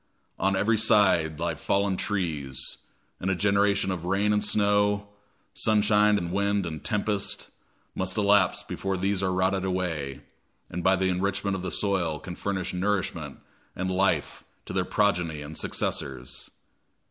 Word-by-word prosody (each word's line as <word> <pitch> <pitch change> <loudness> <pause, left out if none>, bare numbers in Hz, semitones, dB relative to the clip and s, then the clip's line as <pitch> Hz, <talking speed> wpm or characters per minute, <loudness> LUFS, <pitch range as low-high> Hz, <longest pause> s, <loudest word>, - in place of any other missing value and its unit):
On 95 0 +2
every 110 +3 +2
side 95 -8 +4
lie - - 0
fallen 100 -1 0
trees; 75 -10 -2 0.4
and 95 - -2
a 95 - +2
generation 100 0 +2
of 85 -3 -4
rain 100 +4 +1
and 105 - +1
snow, 105 0 +2 0.4
sunshine 105 -1 +3
and 85 -2 -3
wind 100 0 +1
and 80 -2 -6
tempest, 105 -2 -1 0.4
must 95 +1 -2
elapse 100 -3 +3
before 95 -1 -3
these 95 +1 0
are 95 -1 +1
rotted 95 +1 +1
away, 85 -7 -2 0.5
and 85 0 -4
by 95 0 +5
the 95 0 +1
enrichment 100 +2 0
of 95 - -4
the 90 - -3
soil 90 -6 0
can 90 -2 -7
furnish 95 -2 -3
nourishment 95 +1 -2 0.3
and 95 0 -2
life 95 +1 0 0.2
to - - -7
their 90 -1 +1
progeny 90 -8 0
and 75 +2 -8
successors. 60 -4 -3
95 Hz, 145 wpm, -27 LUFS, 90-100 Hz, 0.5 s, by